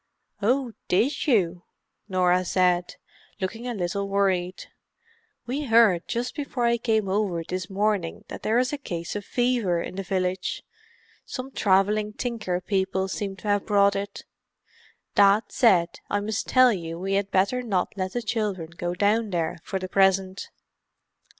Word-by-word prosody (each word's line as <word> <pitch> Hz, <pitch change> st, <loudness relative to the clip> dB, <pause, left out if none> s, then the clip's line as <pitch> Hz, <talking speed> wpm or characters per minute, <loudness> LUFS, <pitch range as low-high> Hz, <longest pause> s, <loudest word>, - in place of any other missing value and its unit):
"Oh—did 245 Hz, +1 st, 0 dB
you?" 180 Hz, -, +2 dB, 0.5 s
Norah 180 Hz, -1 st, +3 dB
said, 180 Hz, 0 st, +1 dB, 0.4 s
looking 225 Hz, +5 st, -4 dB
a 240 Hz, -, -3 dB
little 200 Hz, +1 st, -2 dB
worried. 190 Hz, -2 st, 0 dB, 0.8 s
"We 275 Hz, +5 st, -3 dB
heard 225 Hz, -7 st, +4 dB
just 240 Hz, +1 st, -2 dB
before 275 Hz, -4 st, -2 dB
I 235 Hz, 0 st, +3 dB
came 220 Hz, -3 st, +1 dB
over 190 Hz, -4 st, 0 dB
this 180 Hz, +1 st, -4 dB
morning 200 Hz, -3 st, -1 dB
that -, -, -8 dB
there 220 Hz, +2 st, +1 dB
is 255 Hz, +3 st, +1 dB
a 290 Hz, -, -3 dB
case 170 Hz, -10 st, -5 dB
of 205 Hz, -, -3 dB
fever 240 Hz, -9 st, +1 dB
in 185 Hz, -, -6 dB
the -, -, -1 dB
village—some 190 Hz, +7 st, -5 dB
travelling 210 Hz, 0 st, +2 dB
tinker 215 Hz, -7 st, -2 dB
people 190 Hz, 0 st, -1 dB
seem 195 Hz, 0 st, -3 dB
to 195 Hz, +2 st, -9 dB
have 205 Hz, -1 st, +1 dB
brought 200 Hz, -1 st, +4 dB
it. 200 Hz, 0 st, -5 dB, 0.9 s
Dad 200 Hz, +2 st, +5 dB
said 180 Hz, -8 st, +3 dB
I 205 Hz, -, +1 dB
must 215 Hz, +1 st, -3 dB
tell 255 Hz, -2 st, +5 dB
you 165 Hz, -3 st, -5 dB
we 190 Hz, +2 st, -2 dB
had 200 Hz, 0 st, 0 dB
better 200 Hz, +7 st, +1 dB
not 200 Hz, -7 st, -1 dB
let 185 Hz, -1 st, -3 dB
the 245 Hz, -, -2 dB
children 205 Hz, -7 st, -2 dB
go 175 Hz, +1 st, -4 dB
down 210 Hz, +3 st, +2 dB
there 170 Hz, -3 st, -2 dB
for 195 Hz, -, -3 dB
the 185 Hz, 0 st, -4 dB
present." 190 Hz, 0 st, +2 dB
200 Hz, 150 wpm, -25 LUFS, 185-225 Hz, 0.9 s, Dad